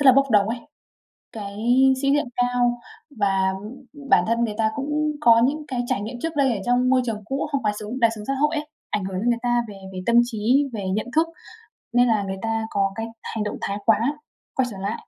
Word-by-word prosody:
rất 285 - +2
là 260 - +10
bốc 275 0 +3
đồng 210 -1 +4
ấy, 235 - -2 0.7
cái 200 -2 -7 0.4
sĩ 275 -1 +2
diện 290 +1 +2
cao 245 -1 +1 0.4
và 195 -2 +2 0.6
bản - - +6
thân 230 +1 +1
người 210 -2 -4
ta 220 -1 +2
cũng 300 +2 -1
có 230 -2 +6
những 300 +3 -1
cái 250 -3 -2
trải 200 - 0
nghiệm 235 +4 -6
trước 325 -1 -3
đây 275 -3 +3
ở 200 - -4
trong 245 +1 +2
môi 260 0 +4
trường 215 -2 -3
cũ 270 +6 -2
không 280 -4 -1
quá 210 - +2
sướng, 220 +5 -5
đời 230 -1 +5
sống 210 -1 -8
xã 275 - +1
hội 300 +2 +2
ấy, 300 0 -3 0.2
ảnh 205 - -1
hưởng 190 -1 -3
đến 235 +5 +1
người 235 -1 +1
ta 240 -1 +2
về 205 - -9 0.2
về 185 - -5
tâm 235 - +2
trí, 245 +5 +1
về 200 -3 -4
nhận 215 - -2
thức 325 +1 +4 0.7
nên 245 +1 +5
là 215 -3 +2
người 190 0 -4
ta 225 0 -1
có 195 -1 +1
cái 225 0 -3 0.2
hành 220 - -3
động 210 - -4
thái 200 +1 -2
quá 225 -1 +5 0.6
quay 260 -1 +2
trở 195 - -8
lại, 200 +4 -4
235 Hz, 240 wpm, -23 LUFS, 210-265 Hz, 0.7 s, là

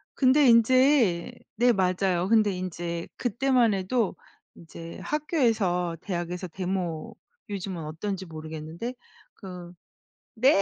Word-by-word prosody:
근데 270 +1 +5
인제 235 - +4 0.2
네 245 +2 +4
맞아요. 185 -1 +1
근데 215 -3 +4
인제 175 -2 -4
그때만 245 -1 +2
해도 195 +1 0 0.4
이제 165 0 -10
학교에서 225 - 0
대학에서 180 -1 -4
데모 180 -2 -4 0.3
요즘은 190 -4 -4
어떤지 190 +5 -4
모르겠는데. 160 +7 -6 0.4
그 180 -3 -9 0.7
네 255 -6 +5
190 Hz, 240 characters per minute, -27 LUFS, 175-235 Hz, 0.7 s, 근데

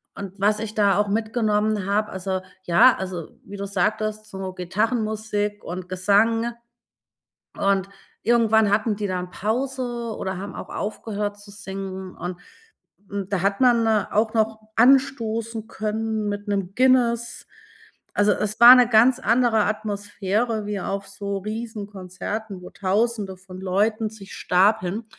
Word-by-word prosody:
Und 195 0 -8
was 210 +2 +2
ich 220 0 -5
da 200 -3 +3
auch 205 0 +2
mitgenommen 215 -1 0
habe, 210 +1 0
also 190 0 -3 0.2
ja 225 +9 +6
also 185 -3 -5
wie 200 +1 -9
du 200 - -4
sagtest, 215 +2 -1
so 190 -1 -6
Gitarrenmusik 210 +2 -2
und 180 +1 -6
Gesang 220 +5 +2 1.0
und 195 -1 +1 0.3
irgendwann 220 -2 +3
hatten 215 +1 +1
die 205 0 -3
dann 180 -1 -4
Pause 240 +1 -2
oder 190 -1 -3
haben 195 +1 -7
auch - - -8
aufgehört 205 -1 -4
zu 205 0 -12
singen 190 -2 -7
und, 180 0 -6 0.7
hm, 200 -2 -4
da 195 -2 -1
hat 200 0 0
man 240 -3 +4 0.3
auch 220 +1 +1
noch 220 0 +1 0.2
anstoßen 230 -3 +2
können 220 0 -2
mit 205 +1 -4
'nem 195 -2 -2
Guinness. 240 -2 +2 0.7
Also, 205 0 +3
es 210 +2 -2
war 240 +1 +12
'ne 250 -2 +5
ganz 240 +2 +5
andere 230 -2 +3
Atmosphäre 210 +1 -2
wie 205 -1 -3
auf 195 +1 -4
so 200 0 -4
Riesenkonzerten, 205 -2 -6
wo - - -10
Tausende 205 0 -1
von 185 0 -11
Leuten 210 +4 0
sich 205 -3 -12
stapeln. 200 +2 +1
210 Hz, 140 wpm, -23 LUFS, 195-225 Hz, 1.0 s, war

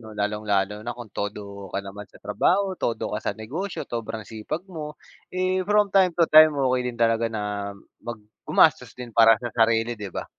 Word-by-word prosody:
'no? 110 -2 -11
Lalong-lalo 105 -1 -1
na 120 +1 -4
kung 120 -4 -10
todo 100 -1 -6
ka 100 - -1
naman 100 +1 -9
sa - - -19
trabaho, 190 - +1
todo 115 - -2
ka - - -1
sa - - -1
negosyo, 155 - -5
sobrang 115 -2 -5
sipag 115 +10 -5
mo. 150 -4 -7 0.4
Eh, 185 0 +1
from 210 -1 +3
time 185 -3 +4
to 170 - +5
time 155 -1 +8
okey 130 -2 +1
din 120 - -13
talaga 115 0 +3
na 105 -2 -3 0.3
mag 120 0 -6 0.3
gumastos - - +3
din 125 -1 -7
para 115 0 +6
sa 120 - -3
sarili, 115 +1 +2
'di 105 -2 -7
ba? - - -4
115 Hz, 190 wpm, -24 LUFS, 105-150 Hz, 0.4 s, time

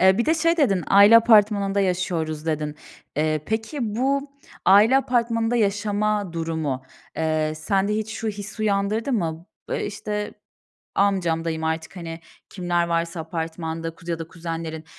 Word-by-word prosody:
Eee, 190 +2 +5
bir 235 - +1
de 320 - +4
şey 330 +1 +2
dedin, 200 - +2
"Aile 205 +3 +8
apartmanında 210 -3 +4
yaşıyoruz." 170 -4 -1
dedin. 155 -1 -2 0.4
Eee, 155 0 0
peki, 220 +6 -3 0.2
bu 275 +3 0 0.3
aile 210 +7 +6
apartmanında 235 -3 +1
yaşama 205 -2 0
durumu, 160 -5 -2 0.3
eee, 155 -1 0
sende 195 +6 0
hiç 220 0 -3
şu 225 - -3
hissi 210 +1 -6
uyandırdı 210 +4 0
mı? 165 -6 -2 0.2
Iıı, - - 0
işte, 210 0 -4 0.6
amcam, 185 -5 +1
dayım, 160 -1 -2
artık, 160 +3 -3
hani, 165 -2 -7 0.3
kimler 175 -2 -1
varsa 170 0 -1
apartmanda, 165 0 -4
kuz 165 - -17
ya 165 -1 -2
da 165 - -6
kuzenlerin, 165 -2 -6
190 Hz, 145 wpm, -23 LUFS, 165-215 Hz, 0.6 s, Aile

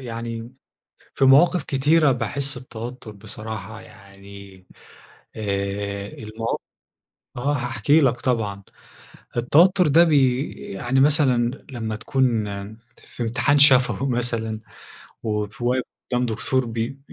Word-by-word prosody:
يعني 115 -1 -6 0.6
في - - +2
مواقف 145 +5 +5
كتيرة 145 +2 +3
باحس 130 +3 -1
بتوتر 120 -1 -8
بصراحة، 110 +1 -8
يعني 100 -2 -14 0.7
آآ، 100 -1 -3
الموا 110 +2 -7 0.9
آه، 140 +4 0
هاحكي 130 +3 +2
لك 125 -3 +1
طبعًا. 105 -6 -1 0.7
التوتر 170 +10 +4
ده 165 +4 +6
بي 135 -4 +2 0.3
يعني 120 +7 0
مثلًا 135 -4 +2
لما 110 -4 -4
تكون 120 -1 0 0.5
في - - -9
امتحان 125 +5 +2
شفوي 135 -1 +5
مثلًا 115 -3 -2 0.6
وواقف 105 +2 -3 0.5
قدام 125 0 +1
دكتور 120 +3 -1
بي 115 +4 -4
120 Hz, 100 wpm, -22 LUFS, 110-135 Hz, 0.9 s, ده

